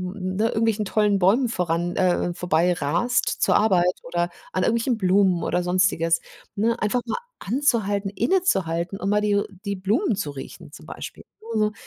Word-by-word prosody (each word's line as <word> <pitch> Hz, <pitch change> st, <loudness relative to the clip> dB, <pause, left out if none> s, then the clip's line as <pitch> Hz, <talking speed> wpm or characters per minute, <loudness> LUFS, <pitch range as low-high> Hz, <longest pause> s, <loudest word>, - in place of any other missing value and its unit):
n 185 Hz, -2 st, -4 dB
ne, 220 Hz, -, +2 dB
irgendwelchen 220 Hz, -2 st, 0 dB
tollen 205 Hz, 0 st, +2 dB
Bäumen 220 Hz, +7 st, +3 dB
voran, 175 Hz, -3 st, -1 dB
äh 180 Hz, -1 st, +1 dB
vorbei 175 Hz, 0 st, +1 dB
rast 175 Hz, -, 0 dB
zur -, -, +4 dB
Arbeit 180 Hz, -4 st, +2 dB
oder 175 Hz, +1 st, -1 dB, 0.2 s
an 185 Hz, -, 0 dB
irgendwelchen 235 Hz, +1 st, +1 dB
Blumen 185 Hz, -2 st, +2 dB
oder 180 Hz, +1 st, 0 dB
Sonstiges, 180 Hz, -2 st, +2 dB, 0.3 s
ne, 230 Hz, +3 st, 0 dB
einfach 220 Hz, +4 st, +1 dB
mal 230 Hz, -, -3 dB, 0.2 s
anzuhalten, 210 Hz, -5 st, 0 dB
innezuhalten 195 Hz, -, 0 dB
und 195 Hz, -, -2 dB
mal 210 Hz, -, +3 dB
die 205 Hz, -1 st, +2 dB, 0.2 s
die 200 Hz, 0 st, -2 dB
Blumen 210 Hz, -, 0 dB
zu 170 Hz, -7 st, -3 dB
riechen, 135 Hz, -1 st, -10 dB
zum -, -, -13 dB
Beispiel. -, -, -9 dB, 0.2 s
Nur 225 Hz, 0 st, -4 dB
so 215 Hz, 0 st, +2 dB
195 Hz, 165 wpm, -23 LUFS, 180-220 Hz, 0.3 s, zur